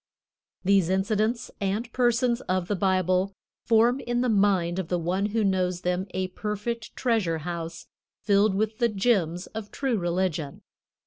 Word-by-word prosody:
These 195 -2 +3
incidents 215 +5 0
and 210 +4 -2
persons 240 0 +2
of 185 -1 0
the 205 - 0
Bible 185 0 +1 0.3
form 235 +3 +4
in 240 -2 -1
the 250 - +1
mind 195 -4 +2
of 185 - -3
the 180 - 0
one 180 +4 0
who 220 +1 0
knows 185 -2 0
them 180 +1 -1
a 185 0 -1
perfect 210 +4 -4
treasure 220 -10 +1
house 170 -1 -5 0.3
filled 200 -1 +3
with 215 +2 -1
the 235 -1 +3
gems 190 -5 +1
of 215 -1 -7
true 260 -6 -1
religion. 175 -4 -2
195 Hz, 150 wpm, -26 LUFS, 180-225 Hz, 0.3 s, form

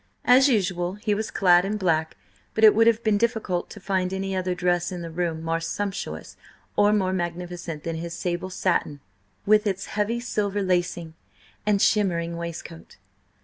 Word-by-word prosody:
As 265 +3 +6
usual, 185 -6 0
he 210 0 -1
was 215 +2 -2
clad 175 -2 +4
in 205 +2 -2
black, 160 -5 0 0.4
but 220 - 0
it 215 - +9
would 225 +1 +4
have 230 0 +3
been 215 -2 +2
difficult 220 -6 -1
to - - -10
find 185 -1 -1
any 190 0 -3
other 185 -1 -1
dress 175 0 0
in 175 -2 -5
the 165 - -6
room 165 -1 -2
more 165 0 0
sumptuous 195 +4 -4 0.4
or 205 0 +4
more 190 -3 +1
magnificent 175 -3 -4
than 165 -1 -3
his 170 +1 -5
sable 175 +1 -3
satin 175 -5 -1 0.5
with 215 +1 +4
its 195 -1 -2
heavy 215 +3 0
silver 205 -4 -1
lacing, 175 -3 -1 0.5
and 205 -2 +3
shimmering 170 -5 +1
waistcoat. 170 -3 -8
185 Hz, 170 wpm, -25 LUFS, 170-205 Hz, 0.5 s, it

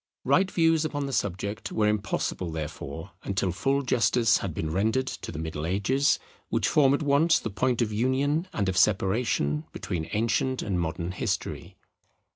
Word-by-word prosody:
Right 190 0 +3
views 165 -3 +3
upon 145 -2 -2
the 135 - -4
subject 100 +1 -2
were 105 -1 +2
impossible 100 -4 -1
therefore 80 +2 -6
until 95 -1 -1
full 135 +10 0
justice 120 -2 +3
had 100 - -3
been 80 0 -3
rendered 110 +9 +1
to - - -6
the 80 - -7
Middle 80 -1 -4
Ages, 105 - +2 0.3
which - - +1
form 140 -2 +4
at 145 - -3
once 150 +4 +4
the 110 - -4
point 125 +3 +1
of 110 -2 -3
union 135 - +1
and 100 - -1
of 95 -1 -1
separation 95 -7 +1
between 80 -2 -4
ancient 115 +4 0
and 95 -4 -1
modern 85 +1 -2
history. 85 -1 -3
105 Hz, 165 wpm, -27 LUFS, 90-135 Hz, 0.3 s, form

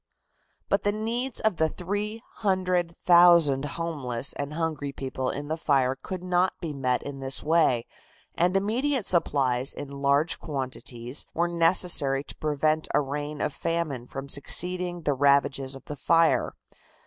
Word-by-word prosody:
But 200 - +1
the 205 - +1
needs 230 +4 -2
of 215 -5 +1
the 160 0 +2
three 205 +6 -4
hundred 185 -4 0
thousand 170 -6 +5
homeless 140 -7 -3
and 145 +1 -5
hungry 155 -4 -2
people 130 -1 -4
in 145 +1 -4
the 160 - -1
city 135 -5 +2
could 185 -1 -6
not 180 0 +1
be 165 -4 -5
met 130 -3 -1
in 140 -1 -7
this 135 0 -2
way, 155 -7 +2 0.5
and 180 +2 +2
immediate 240 +5 0
supplies 135 -6 +1
in 145 - -7
large 140 +3 +1
quantities 130 -2 -4
were 170 +1 +1
necessary 165 -5 +3
to - - -7
prevent 155 +1 0
a - - +5
reign 145 +1 -4
of 150 - -1
famine 155 -7 -3
from 135 +1 -7
succeeding 175 +5 0
the 145 - +1
ravages 140 -1 +2
of 135 - -12
the 150 - -6
fire. 165 +2 +2
155 Hz, 150 wpm, -26 LUFS, 140-180 Hz, 0.5 s, thousand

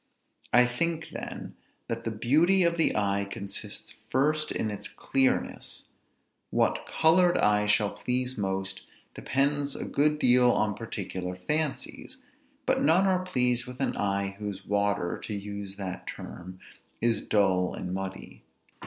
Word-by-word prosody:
I 125 +1 +6
think, 160 +6 -2
then, - - -7 0.3
that 115 0 -4
the - - 0
beauty 155 - +3
of 170 0 +2
the 165 - +2
eye 100 -1 +1
consists, 100 +1 -3 0.2
first, 150 +5 +1
in 110 - -1
its 105 - -3
clearness; 135 -1 0 0.7
what - - +1
colored 175 +2 +4
eye 105 0 +3
shall 105 0 +3
please 125 +1 -1
most, 95 -2 -3 0.3
depends 140 +1 0
a - - -4
good 150 +1 +2
deal 125 -3 +6
on 105 0 +1
particular 95 -4 -5
fancies; 150 +10 -3 0.4
but - - +2
none 165 +6 +4
are 185 -1 +2
pleased 125 -8 +1
with 125 0 -9
an 135 - 0
eye 100 -1 -1
whose 100 -2 -5
water 100 -3 0
(to 105 - -4
use 100 -1 -6
that 95 -3 -6
term) 90 +1 -8 0.4
is 115 -2 +2
dull 95 -3 +2
and 90 - -5
muddy. 95 0 -6
115 Hz, 140 wpm, -28 LUFS, 100-140 Hz, 0.7 s, I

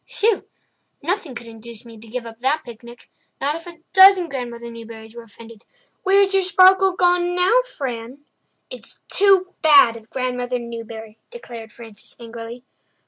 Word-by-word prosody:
"Whew! 430 -1 +2 0.6
Nothing 340 -5 -2
could 235 - -8
induce 230 0 -11
me 230 -1 -12
to 225 - -15
give 240 +2 -5
up 225 0 -11
that 285 +5 0
picnic—not 240 +4 -8
if 330 +2 -9
a 335 -2 -11
dozen 380 -2 +7
Grandmother 235 -3 -6
Newburys 225 -1 -11
were 235 - -8
offended. 230 0 -15 0.4
Where's 390 +1 +3
your 390 - +3
sparkle 375 0 +5
gone 355 0 +2
now, 375 +7 +4 0.2
Fran?" 255 +1 -6 0.5
"It's - - -9
too 385 -2 +3
bad 285 -7 +6
of 225 -1 -13
Grandmother 250 -1 -2
Newbury," 230 -2 -9
declared 235 - -10
Frances 225 -3 -13
angrily. 230 +1 -9
250 Hz, 145 wpm, -21 LUFS, 230-360 Hz, 0.6 s, dozen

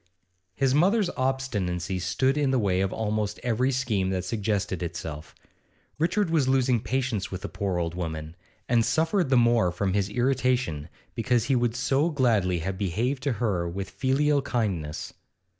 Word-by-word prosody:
His 135 -2 +2
mother's 185 +5 +3
obstinacy 105 -9 -1
stood 130 +9 +1
in 145 -2 +1
the 130 - +2
way 95 -5 +1
of 95 0 0
almost 105 -1 -2
every 125 +2 +1
scheme 115 -8 0
that 95 -1 -2
suggested 100 -3 -1
itself. 80 -3 -6 0.6
Richard 175 +3 +1
was 155 -5 +2
losing 130 -2 +3
patience 125 -5 -2
with 95 -1 -6
the - - -2
poor 95 -3 -2
old 85 -1 -1
woman, 80 -2 -5 0.3
and 115 -1 +3
suffered 160 - +1
the 130 - +4
more 120 -6 +4
from 95 +2 -1
his 100 0 +1
irritation 125 - 0 0.2
because 120 -1 +1
he 135 +3 +1
would 120 -2 +1
so 135 +5 +1
gladly 110 - +2
have 95 -1 -3
behaved 115 +9 -1
to 140 -1 0
her 100 -7 -1
with 95 +2 -5
filial 140 +2 +2
kindness. 95 - -2
115 Hz, 160 wpm, -26 LUFS, 95-130 Hz, 0.6 s, the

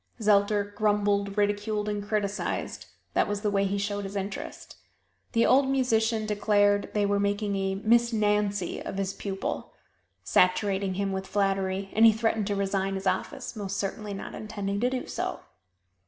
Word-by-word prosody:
Zelter 205 -1 +2
grumbled, 205 -1 +1
ridiculed 205 +1 0
and 205 -1 -2
criticized 205 -1 -2 0.3
that - - +2
was 205 0 -2
the 210 -1 0
way 200 0 +2
he 200 +1 -1
showed 205 0 -2
his 195 +1 -6
interest. 195 0 -6 0.6
The 230 - +4
old 265 +1 +4
musician 225 -4 +1
declared 205 -1 +2
they 205 -1 +3
were 200 0 +1
making 200 0 0
a 195 0 -1
"Miss 235 +4 +3
Nancy" 210 -3 0
of - - -5
his 195 0 -1
pupil 195 -1 -4 0.5
saturating 190 +1 +2
him 200 0 -1
with 190 0 -3
flattery, 195 -1 0
and 220 - +4
he 225 - +9
threatened 220 -2 0
to 205 - 0
resign 195 0 -1
his 190 0 -5
office 190 - -2
most 200 -2 -4
certainly 205 +1 -3
not 195 - -7
intending 200 -2 -4
to 245 +3 +2
do 255 -1 -3
so. - - -4
205 Hz, 165 wpm, -27 LUFS, 195-215 Hz, 0.6 s, he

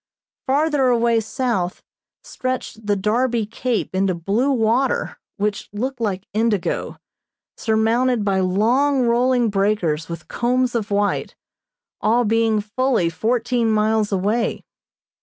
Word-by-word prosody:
Farther 285 0 +2
away 235 -1 +3
south 220 -5 -2 0.4
stretched 255 -4 -5
the 205 - +2
Darby 225 +3 0
Cape 230 +1 -2
into 190 -1 +1
blue 200 +11 0
water 255 - 0 0.2
which 205 0 -2
looked 245 +4 -4
like 195 -3 -2
indigo, 215 -3 -1 0.6
surmounted 225 +1 +1
by 195 -2 +1
long 245 +9 +2
rolling 240 -1 +2
breakers 195 -6 0
with 170 -1 -7
combs 250 +1 0
of 225 -4 -2
white, 205 0 -1 0.7
all 230 +3 +3
being 225 0 +2
fully 215 -4 0
fourteen 230 +5 0
miles 215 0 +1
away. 205 +5 0
225 Hz, 115 wpm, -21 LUFS, 205-245 Hz, 0.7 s, away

